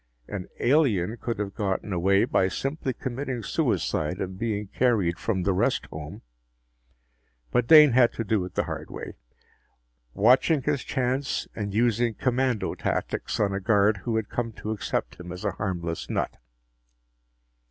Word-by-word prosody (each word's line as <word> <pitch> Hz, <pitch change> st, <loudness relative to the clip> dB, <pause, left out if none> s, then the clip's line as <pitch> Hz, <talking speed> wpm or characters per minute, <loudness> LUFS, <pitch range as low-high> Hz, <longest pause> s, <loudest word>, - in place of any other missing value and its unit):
An 95 Hz, -3 st, -5 dB
alien 120 Hz, -, +2 dB
could 120 Hz, 0 st, -3 dB
have 100 Hz, -1 st, -3 dB
gotten 100 Hz, -1 st, -2 dB
away 95 Hz, +3 st, +3 dB
by 95 Hz, -, +2 dB
simply 135 Hz, +7 st, -2 dB
committing 130 Hz, -1 st, -4 dB
suicide 80 Hz, -3 st, 0 dB
and 95 Hz, 0 st, -4 dB
being 105 Hz, 0 st, -2 dB
carried 100 Hz, -6 st, +1 dB
from 95 Hz, -5 st, -1 dB
the 95 Hz, +1 st, +2 dB
rest 90 Hz, -, +1 dB
home, 80 Hz, +8 st, -8 dB, 1.3 s
but 125 Hz, -1 st, +2 dB
Dane 150 Hz, -2 st, +9 dB
had 120 Hz, 0 st, +5 dB
to 115 Hz, -, -3 dB
do 105 Hz, -2 st, +1 dB
it 90 Hz, -, -10 dB
the -, -, +2 dB
hard -, -, -6 dB
way, -, -, -7 dB, 1.0 s
watching 130 Hz, +7 st, +4 dB
his 130 Hz, -, 0 dB
chance 130 Hz, +2 st, -1 dB
and 100 Hz, -2 st, -4 dB
using 115 Hz, 0 st, +2 dB
commando 125 Hz, -2 st, 0 dB
tactics -, -, -2 dB
on 100 Hz, -2 st, +2 dB
a 95 Hz, -, -1 dB
guard 105 Hz, 0 st, +3 dB
who 110 Hz, +4 st, -3 dB
had 110 Hz, -1 st, -1 dB
come 115 Hz, 0 st, -3 dB
to 105 Hz, -, -5 dB
accept 105 Hz, -3 st, -3 dB
him 90 Hz, -1 st, -8 dB
as 90 Hz, +3 st, -7 dB
a 100 Hz, -, +1 dB
harmless 85 Hz, -5 st, -4 dB
nut. -, -, -1 dB
110 Hz, 155 wpm, -26 LUFS, 95-120 Hz, 1.3 s, Dane